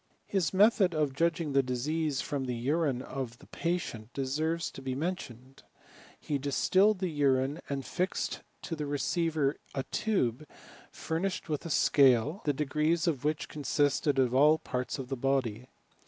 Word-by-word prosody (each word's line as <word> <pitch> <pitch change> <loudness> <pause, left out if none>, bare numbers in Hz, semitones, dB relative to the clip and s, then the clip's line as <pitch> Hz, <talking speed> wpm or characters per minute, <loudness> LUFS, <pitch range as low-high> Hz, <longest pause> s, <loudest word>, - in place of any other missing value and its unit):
His 190 -6 0
method 195 -3 +4
of 150 -3 +1
judging 165 +2 0
of - - -4
the 135 - +5
diseases 140 +3 -1
from 140 -2 -3
the 125 -1 -2
urine 135 +1 0
of 130 -4 -5
the - - -17
patient 160 -10 -3
deserves 155 +5 -1
to - - -10
be 130 -1 -3
mentioned. 135 -6 -5 0.6
He 145 -2 -2
distilled 185 +9 +3
the 185 -2 -2
urine, 140 0 +1
and 135 -2 -3
fixed 185 +1 -2 0.2
to 165 - -4
the 150 -2 -4
receiver 150 0 0 0.2
a 135 - -1
tube 150 - -1 0.4
furnished 170 +3 -3
with 150 +2 -2
a - - -6
scale, 140 - +4
the 150 - +3
degrees 150 +4 +1
of 150 -7 0
which 150 0 -1
consisted 145 -1 +1
of 125 -2 +2
all 145 +4 +6
the 160 - -3
parts 125 +3 -2
of 130 -2 -6
the 135 - -1
body. 125 -3 -1
145 Hz, 165 wpm, -30 LUFS, 130-165 Hz, 0.6 s, all